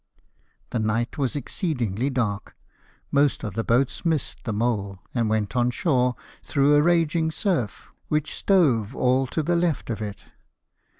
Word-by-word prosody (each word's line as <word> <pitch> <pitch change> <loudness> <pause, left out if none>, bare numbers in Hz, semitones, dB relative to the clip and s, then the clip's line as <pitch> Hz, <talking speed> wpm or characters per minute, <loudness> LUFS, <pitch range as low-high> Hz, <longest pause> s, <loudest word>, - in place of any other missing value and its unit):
The 120 - -1
night 115 +5 -1
was 135 -2 0
exceedingly 130 - -2
dark; 110 -7 -2 0.6
most 140 0 +2
of 105 - -4
the 115 - -1
boats 125 +4 +1
missed 160 -5 -1
the 115 - -1
mole, 105 -3 -1 0.2
and 115 -3 +1
went 110 +2 -1
on 120 0 +3
shore 125 -3 +1 0.3
through 140 0 +2
a 145 - +6
raging 165 -1 +2
surf, 160 - -2 0.2
which 155 -1 -1
stove 135 - +2
all 130 +1 +2
to 155 +5 -2
the 175 +3 +1
left 170 -7 0
of 110 - -4
it. 105 -2 -6
125 Hz, 155 wpm, -24 LUFS, 115-155 Hz, 0.6 s, a